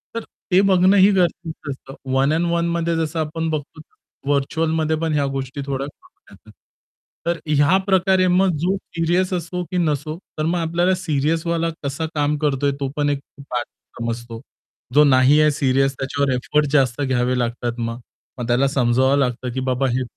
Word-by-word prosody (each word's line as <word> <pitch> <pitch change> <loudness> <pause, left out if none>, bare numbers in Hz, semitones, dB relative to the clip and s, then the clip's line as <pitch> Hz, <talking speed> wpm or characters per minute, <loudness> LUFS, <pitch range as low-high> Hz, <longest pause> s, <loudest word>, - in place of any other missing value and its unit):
तर 230 - -3 0.3
ते 185 +2 +6
बघणंही 190 +2 +5
गरजेचं 170 -5 -1
असतं. 135 0 -10 0.2
वन 135 +3 +2
अँड 170 +2 +1
वनमध्ये 170 0 0
जसं 160 0 -2
आपण 160 +1 -2
बघतो 155 0 -5 0.5
व्हर्चुअलमध्ये 160 +2 +1
पण 160 - 0
ह्या 145 -1 +1
गोष्टी 135 +1 -5
थोड्या 135 0 -3
करतात. 370 - -18 0.8
तर 170 0 +1
ह्या 150 +5 +4
प्रकारे 190 -1 +3
मग 185 +1 +3
जो 185 +2 +2
सीरियस 175 +1 -1
असो 180 +1 -3
की 180 - -1
नसो 155 -2 -1 0.2
तर 155 - -1
मग 175 +2 +1
आपल्याला 170 +3 +1
सीरियसवाला 165 +1 0
कसा 140 +3 -2
काम 145 0 +1
करतोय 145 -1 +1
तो 140 - -1
पण 145 -1 +1
एक 145 - 0 0.3
पार्ट 120 -1 -2 0.3
समजतो. 115 0 -5 0.5
जो 150 - +7
नाही 135 +1 +5
आहे 150 0 +4
सीरियस 135 -1 +1
त्याच्यावर 140 0 -1
एफर्ट 150 +4 +1
जास्त 135 -2 +2
घ्यावे 130 -1 +1
लागतात 120 0 -2
मग, 115 0 -3 0.4
मग 120 - -3
त्याला 125 +3 +3
समजावावं 130 +1 +2
लागतं 125 -1 -1
की 130 - -2
बाबा 130 +2 +1
हे 130 - 0
150 Hz, 165 wpm, -21 LUFS, 135-170 Hz, 0.8 s, जो